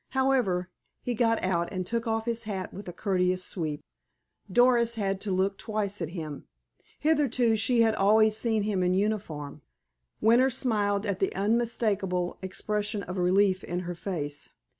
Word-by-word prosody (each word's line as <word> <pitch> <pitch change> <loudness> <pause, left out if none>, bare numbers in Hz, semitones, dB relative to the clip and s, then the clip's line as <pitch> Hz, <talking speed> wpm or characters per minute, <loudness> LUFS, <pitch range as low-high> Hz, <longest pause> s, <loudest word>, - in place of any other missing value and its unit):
However, 225 -10 +1 0.3
he 245 - -1
got 225 -1 +1
out, 170 -2 0
and 185 -2 -3
took 230 +4 -2
off 225 0 -1
his 235 -1 -3
hat 195 -3 -4
with 200 -2 -8
a - - -4
courteous 185 0 0
sweep. 155 -6 -3 0.7
Doris 240 +1 +4
had 195 -3 -1
to 205 - -3
look 190 +1 0
twice 210 -3 -3
at 165 - -2
him. 155 -5 -6 0.5
Hitherto, 265 -7 +2
she 230 +2 +3
had 225 -1 +4
always 215 +1 +4
seen 220 -1 0
him 205 -3 0
in 180 0 +2
uniform. 185 -9 -2 0.6
Winter 240 +4 +5
smiled 210 -6 0
at 200 -3 -2
the 195 - +1
unmistakable 200 -4 0
expression 210 +2 -3
of 180 +1 -5
relief 185 +1 +3
in 175 +1 -3
her 175 0 -4
face. 155 -5 -5
205 Hz, 160 wpm, -28 LUFS, 185-225 Hz, 0.7 s, Winter